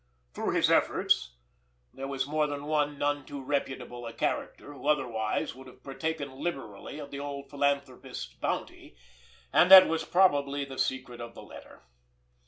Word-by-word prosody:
Through - - -2
his - - +3
efforts 60 0 +2 0.6
there 135 0 -6
was 135 -1 -2
more 150 +1 +1
than 145 0 -5
one 150 -1 0
none 145 0 0
too 140 +1 -7
reputable 135 -3 -3
a 115 - -7
character 145 - -3
who 145 - -8
otherwise 120 -7 0
would 130 +1 -13
have 130 0 -16
partaken 140 -1 -4
liberally 135 -7 -5
of 145 -2 -8
the 140 - -5
old 140 -1 -6
philanthropist's 140 -2 -2
bounty; - - -4 0.6
and 180 - +6
that 190 -1 +12
was 165 0 -1
probably 145 -6 +2
the 135 -1 -8
secret 125 -2 -2
of 115 -1 -8
the - - -10
letter. - - -13
140 Hz, 160 wpm, -29 LUFS, 130-145 Hz, 0.6 s, that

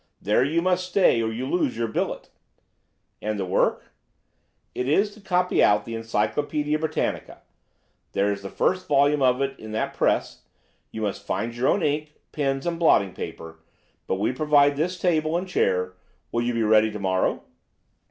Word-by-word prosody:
There 105 +4 +2
you 160 +5 0
must 180 0 +1
stay, 180 -11 +3
or 110 0 -1
you 120 +3 -4
lose 135 -4 0
your 115 -1 -1
billet.' 110 - -3 0.9
"'And 105 0 -2
the 95 - -2
work?' 95 - 0 0.8
"'Is 155 +11 +1
to 215 - -16
copy 180 -2 +2
out 105 0 +3
the 115 - -6
Encyclopædia 145 +7 -1
Britannica. 160 0 -3 0.7
There 100 +1 +1
is 100 -1 -4
the 100 - -7
first 185 - 0
volume 145 0 +3
of 130 +1 +3
it 135 0 -4
in 110 0 -8
that 110 - -2
press. - - 0 0.5
You 110 - -6
must 100 -2 -3
find 115 +1 -2
your 120 +2 0
own 195 - +2
ink, 150 0 -1 0.2
pens, 135 -2 -1
and 170 -1 -2
blotting 100 - +3
paper, 80 0 -8 0.5
but - - 0
we 100 +5 0
provide 145 +1 +3
this 175 +5 -1
table 160 -2 +1
and 185 +2 -4
chair. 90 - 0 0.4
Will 120 - 0
you 120 0 -1
be 115 - +1
ready 110 0 +4
to 105 0 -6
morrow? 95 -1 0
130 Hz, 170 wpm, -24 LUFS, 110-155 Hz, 0.9 s, ready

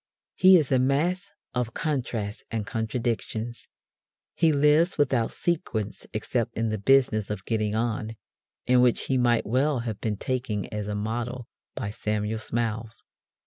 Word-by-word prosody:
He 185 0 +7
is 150 -5 0
a 130 - +4
mass 170 +9 +1 0.2
of 125 -2 -2
contrasts 120 -9 -2
and 110 -2 -2
contradictions. 115 +1 -3 0.7
He 165 -2 +3
lives 150 +4 +4
without 130 -5 +2
sequence 135 - -3
except 115 +2 -2
in 115 0 0
the 110 -1 -2
business 110 -3 +3
of 105 -2 -4
getting 110 -2 0
on 110 -1 -1 0.5
(in 125 0 +5
which 125 -2 +4
he 135 - 0
might 120 -2 +3
well 130 +3 +1
have 110 -4 -5
been 105 -2 -1
taken 120 -4 -2
as 105 -1 -3
a 105 - -2
model 120 +3 -3 0.3
by 105 -6 -3
Samuel 105 +1 -2
Smiles). 115 0 -3
115 Hz, 145 wpm, -26 LUFS, 110-130 Hz, 0.7 s, He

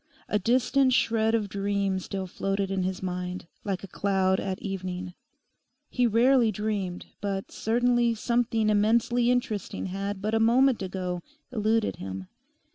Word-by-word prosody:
A 210 - +1
distant 255 +4 +3
shred 225 -2 +2
of 215 -3 0
dream 200 -1 -1
still 190 +1 -4
floated 195 +1 -2
in 195 -1 0
his 185 0 -2
mind, 180 0 -4 0.2
like 195 -2 -3
a - - -6
cloud 190 0 +1
at 190 -1 -3
evening. 185 -2 -4 0.8
He 250 -1 +2
rarely 235 +1 +4
dreamed, 200 -3 -3 0.2
but 195 -1 -3
certainly 240 +1 +2
something 225 -1 +1
immensely 235 +3 +3
interesting 240 -5 -1
had 195 +1 -3
but 215 +3 -2
a 225 - +3
moment 245 +2 +4
ago 185 -2 -3 0.3
eluded 220 -1 +1
him. 95 0 -6
205 Hz, 140 wpm, -27 LUFS, 190-230 Hz, 0.8 s, rarely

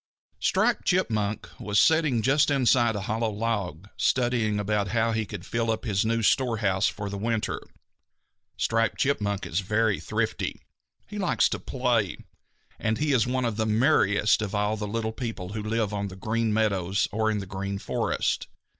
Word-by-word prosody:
_ - - -12
Striped - - +2
Chipmunk 110 - 0
was 105 -1 +1
sitting 155 -8 +3
just 145 +5 +3
inside 125 -4 +3
a 100 - -2
hollow 110 +3 -1
log, 100 -5 -3
studying 120 -4 +1
about 105 0 0
how 115 +3 +1
he 110 -2 -1
could 100 -3 -7
fill 115 0 -1
up 110 +1 -1
his 100 -3 +1
new 115 +1 0
storehouse 110 -6 +2
for 105 +1 -4
the 100 0 -5
winter. 115 0 -1 1.0
Striped 115 -1 +1
Chipmunk 105 -7 0
is 80 - -1
very 105 +1 +1
thrifty. - - -2 0.5
He 210 0 -7
likes 185 - +3
to - - -3
play, 120 - 0 0.6
and 110 -1 0
he 150 -1 +1
is 120 -3 +3
one 130 0 0
of 115 -3 -2
the 110 -1 0
merriest 105 -3 +3
of 105 -1 -3
all 105 +1 +1
the 105 -1 -4
little 110 +1 -2
people 115 -7 -5
who 105 +2 -4
live 110 -1 -1
on 100 0 -2
the 95 - -9
Green 110 +4 -1
Meadows 100 -3 +1
or 110 +1 +1
in 110 - 0
the 100 - -4
Green 100 +1 -4
Forest. - - -1
110 Hz, 175 wpm, -26 LUFS, 100-115 Hz, 1.0 s, sitting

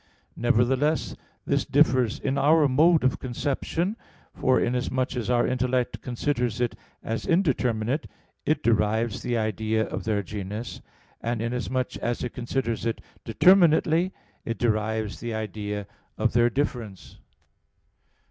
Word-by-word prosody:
Nevertheless, 125 +6 +1 0.3
this - - +1
differs 125 -4 +3
in 135 0 -1
our 150 +2 +4
mode 155 +4 +4
of 130 - +1
conception; 145 - -2 0.4
for, 130 -1 +2
inasmuch 125 +1 -1
as 120 -1 -3
our 120 -1 +3
intellect 125 0 0
considers 125 -2 -1
it 120 -1 0 0.3
as 115 0 -3
indeterminate, 135 - +1 0.4
it 150 -1 0
derives 110 0 +1
the 120 -1 -1
idea 110 0 0
of - - -5
their 105 -2 0
genus; 105 +4 -6 0.4
and 120 0 -2
inasmuch 125 +2 -2
as 120 0 -2
it 125 - -4
considers 120 -1 -2
it 115 -1 -1 0.2
determinately, 170 - +4 0.3
it 115 - -3
derives 110 -2 -1
the 120 -1 -4
idea 105 -2 -4 0.3
of 110 +1 +1
their 120 0 +4
"difference." 120 -7 -4
120 Hz, 125 wpm, -26 LUFS, 110-135 Hz, 0.4 s, our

